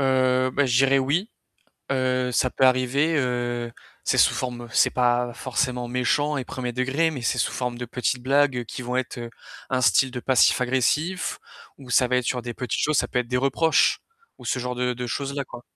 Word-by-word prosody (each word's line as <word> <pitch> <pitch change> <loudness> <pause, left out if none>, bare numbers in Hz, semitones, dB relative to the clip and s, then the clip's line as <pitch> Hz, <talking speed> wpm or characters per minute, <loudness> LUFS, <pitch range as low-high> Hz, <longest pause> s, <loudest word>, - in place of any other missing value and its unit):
Heu, 130 -1 +2
beh, 140 +1 +1
je 120 - +1
dirais 135 0 +4
oui. 160 - 0 0.6
Heu, 130 -1 0
ça 130 - +1
peut 130 - +1
arriver, 130 +5 +2
heu, 120 -2 -2 0.3
c'est - - +1
sous - - +5
forme 120 -1 -4
c'est - - +4
pas 120 -1 +1
forcément 125 -1 -2
méchant 135 +4 0
et 135 - -3
1er 125 0 -5
degré, 135 +6 0
mais 135 -6 -6
c'est 120 - 0
sous - - 0
forme 125 -1 -3
de 125 - -4
petites 125 +1 -2
blagues 135 -2 +2
qui 125 - -7
vont 125 +1 -3
être 130 -1 -3 0.5
un 130 -1 +1
style 130 +1 +3
de 125 -1 -5
passif 130 0 +3
agressif 150 +8 0 0.4
ou 130 -3 -12
ça 125 0 +3
va 125 - +2
être 125 - 0
sur 125 +1 -1
des 120 0 -6
petites 125 -3 -3
choses, 155 0 +1
ça - - +1
peut 125 - -1
être 120 - -5
des 125 - 0
reproches 135 +5 +2 0.4
ou - - -13
ce - - -1
genre 125 0 -3
de 125 0 -1
de 125 0 -5
choses-là, 140 +3 -3
quoi. 120 - -11
125 Hz, 210 wpm, -24 LUFS, 125-135 Hz, 0.6 s, sous